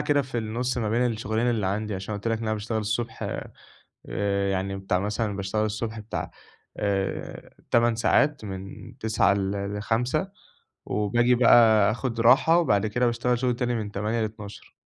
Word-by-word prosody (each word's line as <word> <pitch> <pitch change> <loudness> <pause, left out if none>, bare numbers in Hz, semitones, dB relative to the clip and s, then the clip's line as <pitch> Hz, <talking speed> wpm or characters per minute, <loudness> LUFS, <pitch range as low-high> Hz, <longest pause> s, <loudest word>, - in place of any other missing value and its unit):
كده 145 -1 +2
في 130 -2 -4
النص 120 +3 -2
ما 110 -2 -1
بين 120 +2 +2
الشغلين 110 +2 -1
اللي 110 -5 0
عندي، 105 +1 -2
عشان 95 +3 -5
أنا - - -4
قُلت 115 - -1
لك 115 -1 0
إن 115 - -5
أنا 110 - 0
باشتغل 110 +1 -3
الصبح 110 +2 -3 0.9
آآ 100 -1 0
يعني 95 +1 -2
بتاع 95 -1 -1
مثلًا 105 +1 -2
باشتغل 100 +2 -1
الصبح 110 +1 -4
بتاع 105 +1 -5 0.5
آآ 100 -2 -3 0.2
8 120 -1 +3
ساعات 140 +2 +2
من 95 0 -8
09:00 105 -3 +2
ل 100 +1 -2
ل17:00 125 - -1 0.5
وباجي 120 +4 +2
بقى 110 -4 +6
أخُد 120 0 -3
راحة 135 +8 +5
وبعد 105 - +2
كده 120 +4 0
باشتغل 120 +1 0
شغل 125 -1 +1
تاني 120 -1 -1
من 105 -2 -4
20:00 105 +3 -1
ل00:00. 105 -2 -7
110 Hz, 170 wpm, -25 LUFS, 100-120 Hz, 0.9 s, بقى